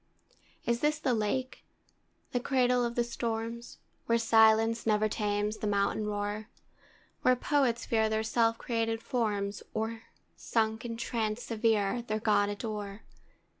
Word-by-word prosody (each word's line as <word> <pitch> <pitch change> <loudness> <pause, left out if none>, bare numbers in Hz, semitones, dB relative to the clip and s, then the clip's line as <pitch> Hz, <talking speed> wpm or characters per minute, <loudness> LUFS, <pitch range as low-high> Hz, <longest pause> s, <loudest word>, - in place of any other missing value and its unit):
Is 235 0 +1
this 300 +2 +1
the 280 -4 0
Lake, 235 +4 -2 0.7
the 245 - 0
cradle 250 -1 +2
of 235 0 -2
the 240 - +2
storms, 235 0 -4 0.3
Where 230 - +4
silence 225 0 +4
never 215 0 +3
tames 210 0 -1
the 215 - -3
mountain 205 +1 +1
roar, 205 +1 -3 0.7
Where 255 - +4
poets 250 -3 +1
fear 220 -1 +2
their 220 0 0
self 225 0 +2
created 225 -1 -1
forms, 205 -4 -1
Or, 225 +1 -3 0.3
sunk 220 0 -1
in 230 -1 -4
trance 230 -1 -2
severe, 225 0 +1
their 215 -2 -2
God 205 -2 +2
adore? 205 -1 -5
225 Hz, 135 wpm, -30 LUFS, 215-235 Hz, 0.7 s, Where